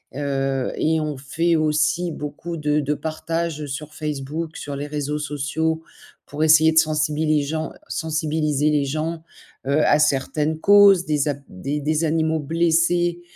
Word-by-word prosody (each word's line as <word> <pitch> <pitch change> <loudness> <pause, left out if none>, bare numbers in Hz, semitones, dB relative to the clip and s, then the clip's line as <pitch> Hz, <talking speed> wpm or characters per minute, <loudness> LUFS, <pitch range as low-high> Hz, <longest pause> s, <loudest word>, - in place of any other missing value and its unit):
Heu 135 -2 -1
et 160 0 +1
on 150 -2 -3
fait 165 +5 0
aussi 155 +3 +1
beaucoup 150 +3 -6
de 150 -1 +1
de 145 +1 -1
partage, 160 0 -3
heu, 150 - -5
sur 150 +2 -6
Facebook, 150 +2 -4
sur 145 -1 -6
les 145 +1 -4
réseaux 150 0 -3
sociaux, 150 +2 -2 0.5
pour 150 +2 -2
essayer 160 0 +6
de - - -2
sensibili 155 0 +1
les 145 - +1
gens 155 +2 -3 0.2
sensibiliser 155 -2 0
les 145 -2 +1
gens, 160 +3 -3 0.4
heu, 140 +3 +2
à 145 - +5
certaines 150 +2 0
causes. 200 -1 +6
Des 150 -1 0
a 145 - -1
des 140 +11 -4
des 155 +2 0
animaux 160 0 +1
blessés, 170 +3 +1
155 Hz, 155 wpm, -22 LUFS, 145-160 Hz, 0.5 s, essayer